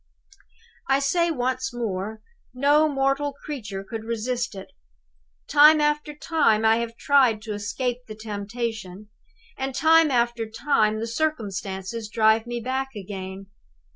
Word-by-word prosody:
"I 270 - +5
say 340 +5 +1
once 260 -2 -1
more, 215 -2 -4 0.3
no 290 +4 +4
mortal 275 +1 0
creature 215 -10 -5
could 225 +2 -6
resist 235 +1 -2
it! 190 - -9 0.8
Time 305 +1 +7
after 295 0 0
time 260 -9 +2
I 220 0 +5
have 230 0 -4
tried 260 -6 +3
to 220 -2 -4
escape 240 +5 -3
the 215 - -8
temptation; 210 -2 -5 0.5
and 265 -1 -3
time 320 +1 +5
after 235 -3 0
time 220 -3 +1
the - - -1
circumstances 215 -6 -3
drive 220 +1 +3
me 240 0 -3
back 265 +2 -3
again. 195 -1 -7
235 Hz, 130 wpm, -24 LUFS, 215-275 Hz, 0.8 s, Time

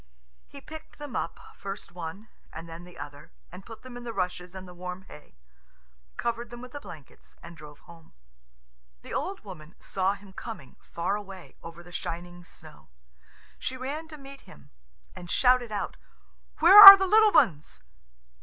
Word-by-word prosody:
He 280 - -12
picked 315 +2 -13
them 295 -5 -9
up, 165 - -4 0.2
first 195 0 -8
one 180 +5 -9 0.2
and 165 +1 -10
then 165 +1 -11
the 180 - -16
other, 145 - -11 0.2
and 190 - -12
put 225 +2 -13
them 255 -1 -11
in 245 - -9
the 235 -1 -7
rushes 180 -1 -4
and 190 0 -9
the 180 - -12
warm 180 +1 -8
hay, 150 -5 -16 0.8
covered 235 0 -4
them 240 - -10
with 250 0 -11
the 290 - -8
blankets, 170 - -15
and 170 0 -12
drove 150 -2 -14
home. 165 -2 -18 0.9
The - - -10
old 390 +1 -4
woman 170 -6 -12
saw 190 +1 -2
him 200 -1 -17
coming, 195 - -10
far 170 +4 -3
away, 195 -3 -10
over 165 +1 -12
the 175 - -16
shining 175 +1 -7
snow. 155 - -18 0.7
She 260 - -5
ran 290 +5 -6
to 310 -1 -12
meet 275 -1 -13
him, 70 - -19 0.4
and 175 - -11
shouted 250 -1 +2
out, 205 - -5 0.6
"Where 380 +6 +9
are 395 0 +15
the 385 - -1
little 430 +2 +4
ones?" 155 - +1
190 Hz, 175 wpm, -26 LUFS, 170-250 Hz, 0.9 s, are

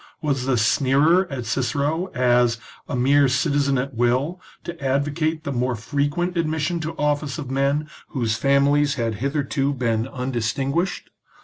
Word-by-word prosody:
Was 135 -4 -1
the 135 - +2
sneerer 140 +10 +3
at 130 -5 -5
Cicero 145 +8 -1
as 120 -2 +3 0.2
" - - -25
a - - -2
mere 140 +3 +4
citizen 140 +2 +1
at 135 +2 -3
will," 130 +9 0 0.2
to 170 -4 -8
advocate 145 +4 0
the 140 - -3
more 125 -1 0
frequent 145 +9 -1
admission 160 +1 -1
to 160 +1 -5
office 150 0 -1
of 140 -5 -6
men 140 +3 +1 0.2
whose 115 -5 -1
families 140 +2 +3
had 115 -3 -1
hitherto 140 0 0
been 115 -2 0
undistinguished 135 +6 -2
140 Hz, 145 wpm, -22 LUFS, 125-150 Hz, 0.2 s, mere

